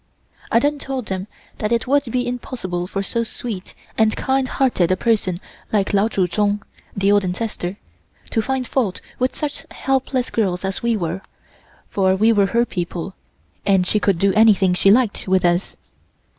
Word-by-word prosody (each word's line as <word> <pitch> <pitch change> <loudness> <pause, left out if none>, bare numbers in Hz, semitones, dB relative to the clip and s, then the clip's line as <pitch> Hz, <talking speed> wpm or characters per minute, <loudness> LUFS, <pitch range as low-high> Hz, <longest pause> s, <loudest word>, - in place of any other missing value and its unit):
I - - +5
then 290 +4 +2
told 270 -3 -4
them 190 0 -4 0.3
that 210 +1 -1
it 235 -1 +1
would 285 +2 +2
be 245 +1 -1
impossible 205 -8 -4
for 195 +1 -3
so 230 +4 -1
sweet 220 -4 -6 0.2
and 220 0 +4
kind 265 0 0
hearted 240 -11 +1
a 185 - +2
person 195 -5 +1 0.3
like 205 -2 +1
Lao 200 +2 +4
Tsu 195 -5 +1
Tsung 205 +3 0 0.3
(the 200 0 +3
old 205 -1 +4
ancestor) 185 0 -3 0.5
to 225 - +2
find 260 +2 -1
fault 235 -7 -1 0.2
with 255 +1 0
such 295 -1 -4
helpless 265 -1 -1
girls 190 -4 0
as 190 0 -3
we 235 -1 +1
were, 175 0 -3 0.7
for 190 -1 +2
we 220 +4 +4
were 200 -2 +3
her 235 +3 +2
people, 175 -2 -4 0.5
and 195 -2 +3
she 210 - +1
could 200 -3 +2
do 195 +2 +2
anything 210 -4 +5
she 190 +2 +3
liked 225 -1 +3
with 185 -1 +3
us. 175 +2 +1
210 Hz, 175 wpm, -21 LUFS, 190-240 Hz, 0.7 s, I